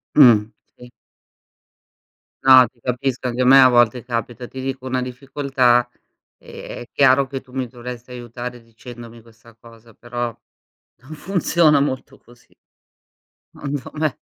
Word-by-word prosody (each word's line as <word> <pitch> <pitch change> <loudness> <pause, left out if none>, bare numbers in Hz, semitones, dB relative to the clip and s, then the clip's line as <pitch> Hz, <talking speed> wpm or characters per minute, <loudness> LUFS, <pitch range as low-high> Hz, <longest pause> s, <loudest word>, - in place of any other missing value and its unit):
Mh, 115 -7 +6 0.3
sì. 125 - -14 1.5
No, 130 -1 +8
ti 120 - -34
capisco 125 +1 -3
anche 125 +1 -2
a - - +2
me 135 +2 +7
a 130 - +8
volte 120 -1 +3
capita. 120 0 -5
Ti 130 - -9
dico, 130 0 -5
una 130 0 -1
difficoltà, 130 -1 0 0.5
ehm, - - -10
è - - -17
chiaro 135 0 +3
che 135 0 -6
tu 130 - -22
mi 130 -1 -3
dovresti 125 +1 -10
aiutare 120 0 -8
dicendomi 115 0 -13
questa 115 0 -20
cosa, 115 0 -18
però 120 +2 -5 0.7
non 130 +5 -15
funziona 165 -3 +2
molto 130 -2 -3
così 120 0 -23 1.0
secondo 140 -2 -5
me. 155 -2 -1
125 Hz, 140 wpm, -20 LUFS, 120-135 Hz, 1.5 s, No